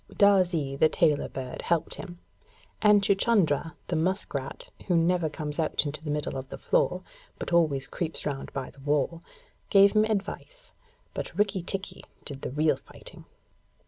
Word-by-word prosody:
Darzee, 180 -9 +3
the 155 +3 +4
tailor 150 -3 +2
bird, 130 -1 -6
helped 165 -1 0
him, 175 -3 -8 0.6
and 210 -1 +6
Chuchundra, 195 -7 +2
the 175 - -2
musk 185 +5 0
rat, 135 -1 -5 0.2
who 180 - +2
never 170 0 +2
comes 150 +1 -5
out 155 0 +1
into 150 +1 -3
the 155 - -5
middle 150 -2 -2
of 130 0 -7
the - - -7
floor, - - +1 0.3
but - - -5
always 155 -6 +3
creeps 165 -2 -4
round 140 -2 -4
by 135 -2 -5
the - - -20
wall, 150 +4 0 0.5
gave 200 0 +7
him 215 0 +4
advice; 220 - -4 0.4
but - - -5
Rikki 200 -2 +1
tikki 195 +3 -4 0.2
did 140 -2 -7
the - - -3
real 150 +4 +2
fighting. - - -12
165 Hz, 165 wpm, -27 LUFS, 145-195 Hz, 0.6 s, gave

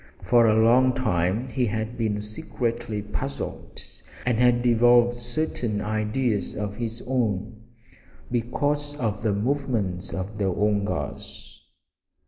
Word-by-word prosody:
For 120 -2 +5
a 110 - +4
long 125 +3 +5
time 105 -1 0
he 125 +1 +1
had 110 +2 -3
been 105 -3 -1
secretly 110 0 -3
puzzled, 130 +7 -5 0.5
and 120 -2 +1
had 125 0 +4
evolved 120 0 +5
certain 120 -3 -2
ideas 110 +2 -1
of 105 -1 -3
his 115 -1 -4
own 110 -4 -1 0.7
because 145 +5 -1
of 110 -7 -2
the 110 -2 +1
movements 110 -6 -1
of 100 +3 -5
the 95 -2 +1
Woongas. 100 -7 -2
115 Hz, 115 wpm, -25 LUFS, 105-125 Hz, 0.7 s, For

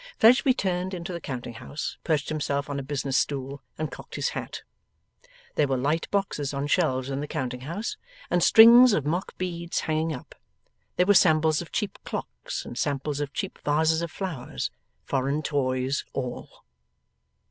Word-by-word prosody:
Fledgeby 250 +3 +6
turned 185 -3 -1
into 175 +1 -5
the 170 - -5
counting 125 -4 -5
house, 145 +6 -6
perched 155 -3 0
himself 145 -1 -2
on 140 - -2
a - - -3
business 135 -1 -2
stool, 140 0 -1 0.2
and 155 0 -3
cocked - - -10
his - - 0
hat. - - -6 0.9
There 150 - +2
were 135 -1 0
light 150 +6 0
boxes 150 -9 -1
on 140 +1 -1
shelves 140 -4 +1
in 135 - -2
the 150 - -4
counting 125 -2 -3
house, 170 - -4 0.3
and 175 - +1
strings 235 +5 +9
of 150 -7 +1
mock 175 +6 -2
beads 170 -2 -3
hanging 160 0 0
up. 130 - -8 0.6
There 180 - +3
were 205 - +5
samples 155 -4 +4
of 170 - -10
cheap 215 -4 -2
clocks, - - -5
and 120 - -6
samples 145 0 -1
of 145 -1 -3
cheap - - -4
vases 160 +2 +2
of 170 - -3
flowers. 165 -9 -4 0.3
Foreign 140 +3 -1
toys, 130 -2 0
all. 125 -2 -6
150 Hz, 170 wpm, -26 LUFS, 140-175 Hz, 0.9 s, strings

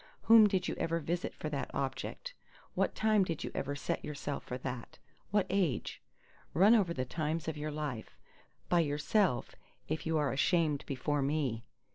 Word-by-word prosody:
Whom 225 -2 +8
did 190 -3 0
you - - -1
ever 165 0 0
visit 170 +3 -2
for - - -5
that - - -3
object? - - -3 0.4
What - - 0
time 215 -2 +3
did 165 -4 -3
you - - -4
ever 140 +1 -2
set 140 - -3
yourself 145 -1 -4
for 125 - -5
that? 125 -2 -6 0.3
What 205 -1 +2
age? 180 -8 -1 0.5
Run 195 +7 +7
over 200 -7 +3
the 130 -6 -2
times 155 +4 -2
of 160 - -2
your 150 +1 -3
life—by 150 +4 -4
yourself, 150 - +1 0.3
if 160 - -3
you 160 0 +2
are 145 -3 +1
ashamed 150 0 +2
before 145 +2 -1
me. 135 -5 -1
155 Hz, 165 wpm, -33 LUFS, 140-180 Hz, 0.5 s, Whom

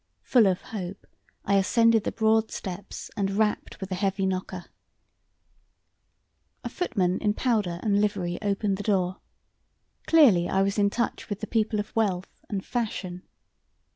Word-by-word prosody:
Full 235 -5 +4
of 185 -1 +1
hope, 195 -3 -7 0.4
I 200 0 +3
ascended 225 +2 +3
the - - 0
broad 220 0 +2
steps 190 0 -7
and 195 -1 0
rapped 210 +1 -1
with 190 -1 -6
the 185 - -2
heavy 195 +1 0
knocker. 185 -1 -3 2.0
A - - -3
footman 190 - 0
in 210 -1 0
powder 210 -9 0
and 205 -2 +2
livery 185 -4 -1
opened 200 -1 0
the 205 - -5
door. 190 -3 +1 0.9
Clearly 235 - +5
I 195 0 +2
was 195 +1 0
in 200 0 +4
touch 235 +3 -3
with 205 -1 -3
the 215 - -4
people 215 -1 0
of 205 - -5
wealth 195 -5 -1
and 195 -2 -3
fashion. 195 -6 -4
200 Hz, 150 wpm, -26 LUFS, 185-220 Hz, 2.0 s, Clearly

